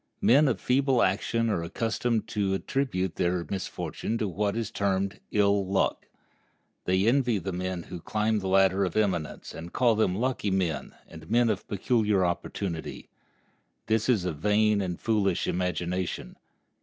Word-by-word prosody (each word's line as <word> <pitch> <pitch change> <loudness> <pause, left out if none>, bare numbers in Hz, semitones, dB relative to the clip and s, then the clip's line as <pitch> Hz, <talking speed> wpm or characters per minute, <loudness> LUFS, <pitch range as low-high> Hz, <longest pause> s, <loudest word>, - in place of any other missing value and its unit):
Men 145 +5 +6
of 115 -8 0
feeble 130 +2 +2
action 115 +4 +1
are 85 - 0
accustomed 115 +5 -1
to 100 -2 0
attribute 95 -7 -2
their 90 -1 0
misfortune 100 +3 -3
to 110 - -1
what 100 +3 -1
is 115 -2 -3
termed 100 -2 -1
ill 100 -1 +3
luck. 95 0 0 0.8
They 95 +2 +2
envy 120 -1 +3
the 95 +1 -4
men 90 -1 -3
who 85 - -8
climb 110 +2 0
the 95 - -4
ladder 95 0 +4
of 90 +1 -2
eminence, 90 -7 -1
and 85 +1 -8
call 120 -3 +3
them 105 -4 +1
lucky 120 -1 -1
men 85 -7 -1
and 80 -1 -12
men 120 0 +3
of 100 - -4
peculiar 105 -2 +1
opportunity. 85 -1 -4 0.8
This 110 +2 +1
is 105 -8 +2
a 90 - -1
vain 105 +6 +2
and 90 -3 -3
foolish 105 -5 +1
imagination. 90 0 -2
100 Hz, 155 wpm, -27 LUFS, 90-110 Hz, 0.8 s, Men